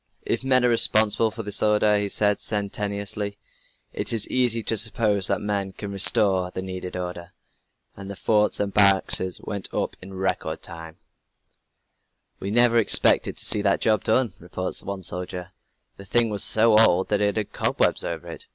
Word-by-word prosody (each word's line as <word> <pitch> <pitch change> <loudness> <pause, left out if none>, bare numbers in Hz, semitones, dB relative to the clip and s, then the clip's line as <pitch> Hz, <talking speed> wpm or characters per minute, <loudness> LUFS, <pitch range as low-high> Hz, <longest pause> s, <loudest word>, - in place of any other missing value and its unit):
"If - - -2
men 130 -2 +3
are - - +3
responsible 110 -1 +3
for 110 +1 -8
this 105 0 -2
disorder," 105 0 +2
he 100 0 -2
said 105 0 +1
sententiously, 100 0 -3 0.6
"it - - -5
is 115 -3 -2
easy 120 -3 +1
to 115 - -1
suppose 105 -3 +1
that - - -1
men 100 -2 -3
can 100 +1 -8
restore 95 -1 +3
the 95 +1 -7
needed 95 -1 -7
order." 90 -1 -7 0.6
And 100 0 -10
the 100 - -7
forts 105 +1 0
and 100 -1 -2
barracks 100 -2 +4 0.2
went 100 -3 -4
up - - -3
in 95 +1 -11
record 95 -4 -3
time. 80 -2 -9 1.4
"We 100 - -5
never 120 +1 +3
expected 110 - +3
to - - 0
see 105 - +5
that 100 -1 0
job 110 -2 +1
done," 115 -2 +1
reports 90 +1 -2
one 100 -1 -7
soldier. 90 +1 -6 0.5
"The 100 - -12
thing 115 +3 +1
was 100 -2 -2
so 110 0 +3
old 95 -4 +3
that 105 -1 0
it 105 +1 0
had 105 -2 -4
cobwebs - - 0
over - - -6
it. - - -10
100 Hz, 175 wpm, -23 LUFS, 95-110 Hz, 1.4 s, see